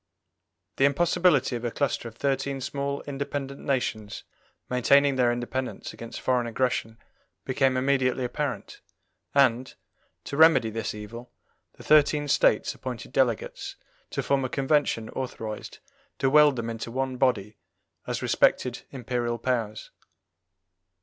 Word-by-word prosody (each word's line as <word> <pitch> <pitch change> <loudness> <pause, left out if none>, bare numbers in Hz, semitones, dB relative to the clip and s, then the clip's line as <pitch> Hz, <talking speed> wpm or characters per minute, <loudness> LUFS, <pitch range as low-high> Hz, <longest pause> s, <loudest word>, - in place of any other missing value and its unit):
The 135 - +4
impossibility 155 -2 +3
of 120 - -5
a 120 - 0
cluster 135 -1 -1
of 115 - -10
thirteen 140 +1 -1
small 140 +1 -3
independent 140 -1 -4
nations 110 -6 -2 0.4
maintaining 140 +3 +4
their 125 -2 +3
independence 120 +2 -4
against 115 0 -8
foreign 125 -2 +1
aggression 115 -2 -1 0.5
became 130 0 +1
immediately 130 -1 +1
apparent, 125 -3 -4 0.5
and, 130 -2 +3 0.5
to 140 - -5
remedy 160 -8 +6
this 110 -1 -3
evil, 115 +3 -9 0.4
the - - -14
thirteen 150 -1 +4
States - - +3
appointed 125 -3 -7
delegates 125 -5 -1 0.3
to - - -3
form 140 -1 +1
a 130 - -2
convention 135 -5 +1
authorized 110 -5 -6 0.4
to 135 0 +1
weld 150 -1 +6
them 115 -1 -3
into 115 0 -6
one 130 +1 -2
body 110 -5 0 0.5
as - - -3
respected 125 -1 +2
Imperial 120 -2 -2
powers. 115 -3 -2
130 Hz, 125 wpm, -26 LUFS, 120-140 Hz, 0.5 s, remedy